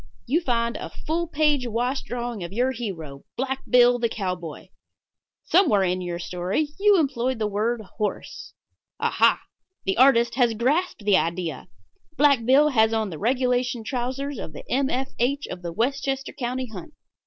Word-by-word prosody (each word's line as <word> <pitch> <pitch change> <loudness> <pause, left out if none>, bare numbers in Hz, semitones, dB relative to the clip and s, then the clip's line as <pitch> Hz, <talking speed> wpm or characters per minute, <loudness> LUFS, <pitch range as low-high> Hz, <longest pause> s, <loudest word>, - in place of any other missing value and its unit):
You 300 +8 +1
find 235 -5 0
a - - -6
full 335 +2 -3
page 295 -5 +1
wash 245 +4 -1
drawing 240 -4 -5
of 170 - -6
your 250 +5 +1
hero, 165 - -6
Black 265 +1 -1
Bill, 245 0 +5
the 235 -1 +1
cowboy. 180 -7 -5 0.8
Somewhere 310 - +4
in 185 0 0
your 175 -1 -4
story 180 - -2
you 410 0 +5
employed 260 -4 0
the 220 - -1
word 215 +3 -1 0.2
"horse." 210 -2 -4 0.5
Aha! - - +3 0.5
the 190 - 0
artist 240 -2 +5
has 240 -3 +2
grasped 270 - 0
the 205 -2 +5
idea. 170 0 -2 0.5
Black 280 -5 +4
Bill 280 +5 +5
has 220 -4 +3
on 220 -3 -1
the 155 - -7
regulation 250 0 0
trousers 260 +3 -3
of 155 - -7
the - - -10
M. 270 +1 +2
F. 265 +2 -2
H. 280 +4 0
of 180 - -7
the 170 -1 -5
Westchester 270 +6 -1
County 255 0 -3
Hunt. 200 -8 -10
240 Hz, 165 wpm, -24 LUFS, 210-270 Hz, 0.8 s, Bill